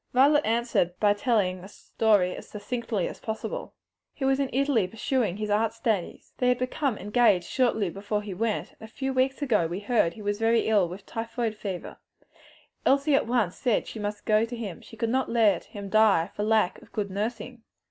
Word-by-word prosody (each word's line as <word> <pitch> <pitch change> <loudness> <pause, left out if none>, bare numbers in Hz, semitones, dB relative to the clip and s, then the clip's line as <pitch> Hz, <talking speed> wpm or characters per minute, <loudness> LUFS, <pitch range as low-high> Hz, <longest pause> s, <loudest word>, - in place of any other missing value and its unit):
Violet 290 +4 +5
answered 225 -6 0
by 205 -1 +4
telling 205 -5 0
the 190 - -10
story 205 -3 +1
as - - -10
succinctly 220 -2 -3
as - - -8
possible. 225 - -5 0.4
"He 270 - -3
was 270 0 +2
in 275 -2 0
Italy 265 -7 +2
pursuing 225 -2 -1
his 210 -1 -3
art 220 +2 +2
studies," 215 -8 -1
she - - -23
said. - - -30
"They 250 - +2
had 250 - +3
become 255 -1 -1
engaged 210 -4 +3
shortly 235 -6 +1
before 205 +2 -3
he 205 -2 -5
went, 220 +3 -1
and - - -27
a 220 0 -10
few 270 +1 -3
weeks 265 +2 +1
ago 215 -11 +2
we 175 +3 -4
heard 210 -5 +1
he 215 - -10
was 205 0 -1
very 225 +1 +3
ill 205 -5 +2
with 190 +3 -9
typhoid 230 0 -3
fever. 195 -4 -6 0.9
Elsie 280 +2 +3
at 275 - +3
once 230 -7 +1
said 245 -5 0
she 225 - -8
must 205 0 -4
go 215 0 +3
to 230 +1 -4
him, 210 -7 -6
she - - -14
could 230 -1 -1
not 265 +1 0
let 220 -6 +3
him 200 -1 -8
die 210 -5 +3
for - - -3
lack 215 -3 +1
of - - -18
good 205 -3 -3
nursing. 230 +4 -4
220 Hz, 210 wpm, -27 LUFS, 205-245 Hz, 0.9 s, Violet